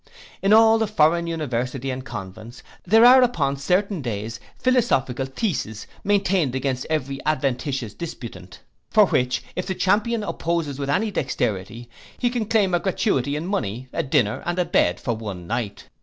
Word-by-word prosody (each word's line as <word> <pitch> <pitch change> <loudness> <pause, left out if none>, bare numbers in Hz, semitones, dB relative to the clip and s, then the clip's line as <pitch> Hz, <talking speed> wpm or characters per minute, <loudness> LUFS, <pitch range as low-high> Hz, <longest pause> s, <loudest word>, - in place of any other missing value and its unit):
In 195 - +2
all 225 +1 +6
the 220 - +1
foreign 170 -3 +2
universities 135 -4 -2
and 130 0 -5
convents, 110 +1 -9 0.2
there 225 +5 +6
are 255 +1 +9
upon 145 - +1
certain 180 +5 0
days 115 -1 -4 0.2
philosophical 135 - +1
theses 135 - -3 0.2
maintained 195 -9 +1
against 130 -1 -2
every 140 -3 -2
adventitious 135 -5 -1
disputant; 120 - -8 0.3
for - - +6
which, 125 0 0
if 180 - -3
the 190 - -2
champion 215 +5 +1
opposes 165 -7 -2
with 140 -1 -3
any 210 +9 +1
dexterity, 115 - -2 0.3
he 245 -1 0
can 240 -3 -1
claim 210 -4 +2
a 175 - +3
gratuity 170 - 0
in 155 +3 -3
money, 130 - -3
a - - 0
dinner, 115 -5 +1
and 175 +1 -2
a 180 - +2
bed, 85 - +2
for 120 - -2
one 100 -6 -7
night. 115 0 -4
140 Hz, 160 wpm, -23 LUFS, 120-195 Hz, 0.3 s, are